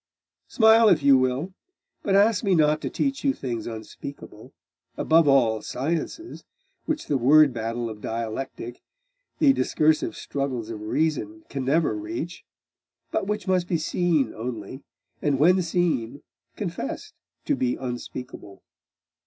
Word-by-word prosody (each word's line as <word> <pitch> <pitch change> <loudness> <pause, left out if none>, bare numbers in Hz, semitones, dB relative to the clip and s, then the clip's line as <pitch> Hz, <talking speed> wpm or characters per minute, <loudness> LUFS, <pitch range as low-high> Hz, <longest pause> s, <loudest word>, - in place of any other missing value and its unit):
Smile 225 -1 +6
if - - +3
you 140 -1 +7
will. 130 +8 0 0.5
But 195 - +1
ask 205 +1 +4
me 195 -3 +3
not 155 -1 +3
to - - -3
teach 275 0 -2
you 275 -1 +2
things 120 -4 -4
unspeakable, 115 +5 -9 0.5
above 160 -1 +4
all 120 -6 +3
sciences, 165 - -4 0.4
which 315 -1 -2
the 140 - 0
word 145 +2 +6
battle 115 +1 -3
of 110 -2 -8
dialectic, 115 +2 -5 0.6
the 280 -3 +5
discursive 155 - +1
struggles 130 -5 -4
of 105 -2 -7
reason, 110 -3 -1
can 135 -2 -4
never 160 +5 +2
reach, 330 +1 -5 0.7
but 195 - -1
which 210 -1 -3
must 185 -2 +1
be 175 - +1
seen 155 -5 0
only, 115 +2 -6 0.4
and 145 -2 +1
when 180 +6 +4
seen 165 -9 -1 0.3
confessed - - -5 0.3
to - - +1
be 125 -1 0
unspeakable. 120 -4 -7
140 Hz, 135 wpm, -25 LUFS, 120-180 Hz, 0.7 s, you